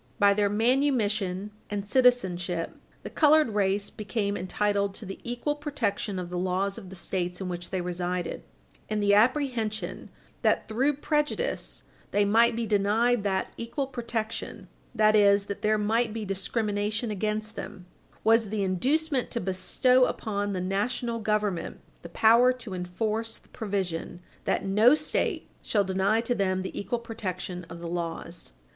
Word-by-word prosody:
By 200 0 +5
their 205 0 +2
manumission 215 -5 +1 0.2
and 205 -1 -3
citizenship, 185 -9 +2 0.3
the - - -5
colored 305 -3 +5
race 200 -1 0
became 205 -1 -2
entitled 200 +1 0
to 215 - -7
the 195 - -7
equal 245 +5 -2
protection 230 -9 -2
of 180 -1 -5
the 180 - -2
laws 190 +2 -1
of 185 - -11
the 190 - -9
States 180 -1 -3
in 190 - -4
which 175 0 -5
they 185 - -2
resided, 180 0 -3 0.5
and 215 -1 0
the 205 0 +4
apprehension 230 -1 +1 0.3
that, - - +2
through 260 +7 +1
prejudice, 300 - -2 0.3
they 205 0 +2
might 225 +3 +4
be 230 0 -1
denied 215 +3 +2
that 190 -1 -1
equal 235 +4 -3
protection, 235 -4 -4 0.3
that 215 -1 +4
is, 200 -1 +5
that 200 - -5
there 215 0 +2
might 220 +2 +1
be 220 -1 -4
discrimination 205 +3 -1
against 215 +1 -2
them, 185 -3 -7 0.4
was 225 -1 +4
the 210 -1 -1
inducement 265 - +1
to 235 - -2
bestow 250 +7 +3
upon 205 -4 -2
the 185 - -2
national 230 +5 -1
government 210 -4 -1 0.2
the 170 - -9
power 230 +7 +5
to 250 -5 -6
enforce 215 +5 -3
the - - -23
provision 190 -6 -3 0.3
that - - 0
no 215 +8 +5
State 305 0 -1
shall 205 -2 +1
deny 195 +3 +1
to 240 +1 0
them 190 -4 0
the 190 - -6
equal 240 +4 -2
protection 185 -6 -5
of 165 - -8
the 170 - -5
laws. 170 0 -5
210 Hz, 155 wpm, -27 LUFS, 190-235 Hz, 0.5 s, By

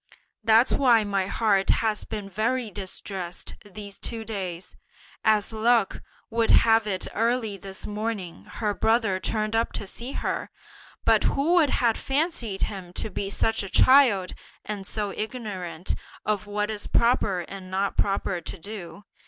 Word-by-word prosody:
That's 225 +3 +5
why 240 -5 +5
my 200 -2 0
heart 200 -3 +2
has 220 -2 +1
been 210 -2 -5
very 220 +4 -1
distressed 185 -2 -6
these 205 -1 -9
two 225 -2 -5
days! 185 -5 -5 0.5
As 215 0 +3
luck 225 -1 +2 0.3
would 230 0 +1
have 225 -1 +5
it 190 -2 -2
early 230 -2 0
this 195 0 -7
morning 210 -5 -4
her 210 -2 -2
brother 220 -3 +2
turned 215 +3 -1
up 225 +1 +1
to - - -4
see 240 +7 -6
her, - - -2 0.6
but - - +4
who 300 +5 +2
would 330 -5 +5
have 235 -3 +2
fancied 270 - -1
him 185 -4 -4
to 210 - -3
be 195 - -3
such 225 +2 0
a 195 - -6
child, 245 -9 +5 0.3
and 205 -2 -5
so 210 -2 -2
ignorant 195 -7 -4 0.3
of 210 -1 -1
what 210 +1 -1
is 210 -1 -5
proper 220 -6 +2
and 185 +1 -9
not 195 +1 -1
proper 195 -2 0
to 180 - -6
do? 200 +1 -9
210 Hz, 155 wpm, -26 LUFS, 195-225 Hz, 0.6 s, That's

